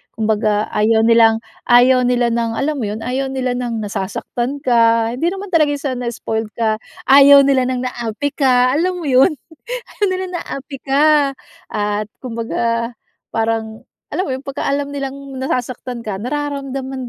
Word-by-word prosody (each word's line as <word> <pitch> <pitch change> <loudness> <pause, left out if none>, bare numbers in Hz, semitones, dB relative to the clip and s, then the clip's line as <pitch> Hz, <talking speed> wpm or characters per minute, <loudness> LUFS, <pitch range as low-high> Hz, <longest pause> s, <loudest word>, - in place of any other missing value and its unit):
Kumbaga, 215 -1 0
ayaw 220 +1 +3
nilang 225 -1 +5 0.3
ayaw 250 +1 +5
nila 245 -1 +2
ng, 230 -1 -1
alam 300 +2 0
mo 230 - -2
yun, 215 - -5
ayaw 265 +2 -2
nila 255 -2 -1
ng 240 -2 -3
nasasaktan 215 +6 -3
ka. 230 -2 +3
Hindi 335 +7 0
naman 390 +1 -6
talaga 305 -3 +4
siya 280 -2 -3
na 245 -1 -4
spoiled 220 -1 -4
ka, 220 -2 +1 0.3
ayaw 280 +1 +8
nila 270 -2 +3
ng 255 -1 -2
naapi 240 +3 -3
ka, 255 -2 +3
alam 360 +3 0
mo 325 - -5
yun, 265 +6 +5 0.7
ayaw 415 - +1
nila 375 0 -2
naapi 275 +1 -7
ka 285 +1 +3 0.4
at 210 0 -1 0.2
kumbaga 230 -1 -2 0.4
parang, 225 -1 -2 0.3
alam 370 - 0
mo - - -3
yung 265 - -12
pagka 275 - -3
alam 280 0 -1
nilang 275 -1 -6
nasasaktan 250 -2 -3
ka, 205 -3 -3
nararamdaman 270 -1 -4
250 Hz, 160 wpm, -18 LUFS, 230-275 Hz, 0.7 s, ayaw